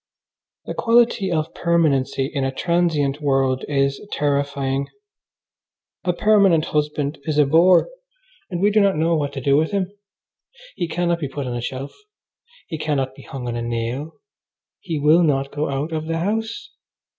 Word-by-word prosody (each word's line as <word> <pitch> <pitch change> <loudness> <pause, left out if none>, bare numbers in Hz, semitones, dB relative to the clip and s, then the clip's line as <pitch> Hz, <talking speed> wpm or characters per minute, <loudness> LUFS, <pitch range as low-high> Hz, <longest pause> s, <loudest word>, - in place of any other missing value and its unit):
The - - -4
quality 230 -5 +2
of 155 -2 -1
permanency 150 -6 +1
in 140 0 -3
a 135 - 0
transient 155 -2 0
world 135 -2 +1
is 140 -1 0
terrifying. 140 -1 -1 1.2
A 180 - +3
permanent 195 -4 +4
husband 150 -1 -1
is 155 -2 -1
a 150 - +6
bore, 170 +5 +5 0.6
and 175 -1 -3
we 205 +1 +4
do 215 - +4
not 200 -1 +3
know 165 +2 +2
what 145 -2 -1
to 135 - -5
do 140 +2 +3
with 160 +1 +2
him. 195 -2 -1 0.8
He 175 - -2
cannot 170 0 0
be 145 -4 -3
put 140 0 -5
on 125 -1 -3
a 120 - -3
shelf. 130 +3 -5 0.7
He 160 -3 -5
cannot 135 -4 -1
be - - -14
hung 130 -3 -7
on 120 - -3
a 120 - -3
nail. 120 +6 -3 0.7
He 165 -4 -4
will 150 +4 +5
not 140 -4 +1
go 150 +1 -2
out 140 +4 -2
of 155 0 -3
the 165 0 -1
house. 225 - -3
150 Hz, 170 wpm, -21 LUFS, 135-170 Hz, 1.2 s, a